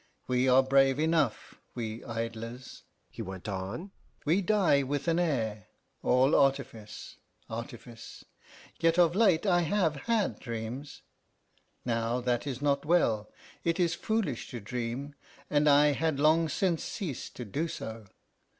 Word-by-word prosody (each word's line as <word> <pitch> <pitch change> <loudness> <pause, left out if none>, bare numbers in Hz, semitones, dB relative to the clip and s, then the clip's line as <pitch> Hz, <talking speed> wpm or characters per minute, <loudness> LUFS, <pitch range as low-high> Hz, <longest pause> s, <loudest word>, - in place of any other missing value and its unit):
We 125 +1 +2
are 130 +1 +6
brave 135 0 +4
enough, 155 -6 0
we 115 -2 -4
idlers," 115 +1 -6 0.3
he - - -7
went 95 +1 -7
on; 100 - -5 0.3
"we 170 +7 +3
die 185 -7 +3
with 140 +2 -3
an 165 +1 +2
air 110 - -1 0.3
all 130 +4 +3
artifice, 115 -6 -1 0.3
artifice!... 115 0 -9 0.5
Yet 165 0 +3
of 170 -2 +5
late 195 -5 +4
I 175 -3 +4
have 170 -2 +1
had 225 -3 +1
dreams. 120 +4 -6 0.8
Now 115 0 0
that 125 +2 -1
is 135 0 -4
not 140 -1 +2
well. 115 -11 +2 0.3
It 170 +2 0
is 170 -2 +2
foolish 215 - -2
to 120 - -6
dream, 125 +5 -4 0.4
and 150 0 +4
I 145 +1 +6
had 155 0 0
long 160 +2 +4
since 175 -2 0
ceased 170 - -5
to 125 - -6
do 145 - -2
so. 110 -8 -7
135 Hz, 140 wpm, -30 LUFS, 115-165 Hz, 0.8 s, are